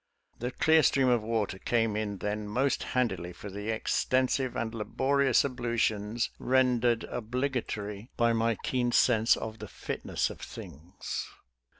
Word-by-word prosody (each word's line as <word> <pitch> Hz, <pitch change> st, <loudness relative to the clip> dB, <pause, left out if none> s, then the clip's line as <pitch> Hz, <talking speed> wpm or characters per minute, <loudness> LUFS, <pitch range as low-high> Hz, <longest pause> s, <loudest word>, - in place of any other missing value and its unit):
The 120 Hz, -, -2 dB
clear 160 Hz, +5 st, +4 dB
stream 135 Hz, -1 st, +3 dB
of 120 Hz, -2 st, +3 dB
water 110 Hz, -3 st, -2 dB
came 115 Hz, -2 st, +1 dB
in 105 Hz, -2 st, -2 dB
then 105 Hz, +1 st, -3 dB
most 130 Hz, +6 st, +1 dB
handily 95 Hz, -9 st, -1 dB
for 100 Hz, +3 st, -9 dB
the 105 Hz, +2 st, -5 dB
extensive 130 Hz, +3 st, +1 dB
and 115 Hz, -1 st, -2 dB
laborious 130 Hz, +5 st, +2 dB
ablutions 115 Hz, -3 st, -1 dB
rendered 125 Hz, -2 st, +2 dB
obligatory 115 Hz, -3 st, -3 dB
by 115 Hz, 0 st, +3 dB
my 115 Hz, 0 st, +1 dB
keen 120 Hz, +1 st, -1 dB
sense 115 Hz, -1 st, +4 dB
of 110 Hz, 0 st, -6 dB
the -, -, -7 dB
fitness -, -, -3 dB
of -, -, -11 dB
things. 85 Hz, +7 st, -7 dB
115 Hz, 135 wpm, -29 LUFS, 105-125 Hz, -, clear